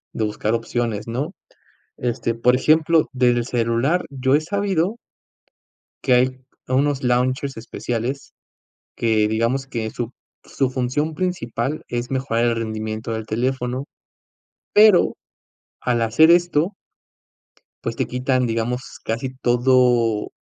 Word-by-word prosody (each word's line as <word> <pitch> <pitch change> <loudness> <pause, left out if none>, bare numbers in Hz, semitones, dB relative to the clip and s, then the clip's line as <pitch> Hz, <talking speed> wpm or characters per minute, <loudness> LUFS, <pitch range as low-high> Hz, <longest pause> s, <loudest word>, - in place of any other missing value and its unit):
de 110 - -1
buscar 105 +1 -1
opciones, 115 -2 -2
¿no? 135 +10 -3 0.6
Este, 120 -1 -2
por 125 +2 +3
ejemplo, 155 +2 +3
desde 125 -1 +3
el 120 - -2
celular 120 +8 +1
yo 135 0 +1
he 150 - +2
sabido 195 +3 -1 1.1
que 130 - +4
hay 130 +1 +2 0.3
unos 140 +2 +1
launchers 130 +2 0
especiales 120 +3 -4 0.6
que, 110 -2 +2
digamos, 115 +5 0
que 115 -4 -3
su 120 -1 -4 0.3
su 135 -2 -1
función 130 +5 -1
principal 155 -6 -2
es 120 +1 -3
mejorar 130 -3 0
el 120 -1 +2
rendimiento 110 0 -4
del 110 -1 -3
teléfono, 125 +3 -2 0.9
pero 210 -4 +6 0.6
al 120 -2 0
hacer 115 +9 +5
esto 175 +1 +3 1.1
pues, - - -3
te - - 0
quitan, 125 0 0
digamos, 115 +2 -1 0.2
casi 125 +3 -3
todo 120 -3 +2
125 Hz, 120 wpm, -21 LUFS, 115-140 Hz, 1.1 s, pero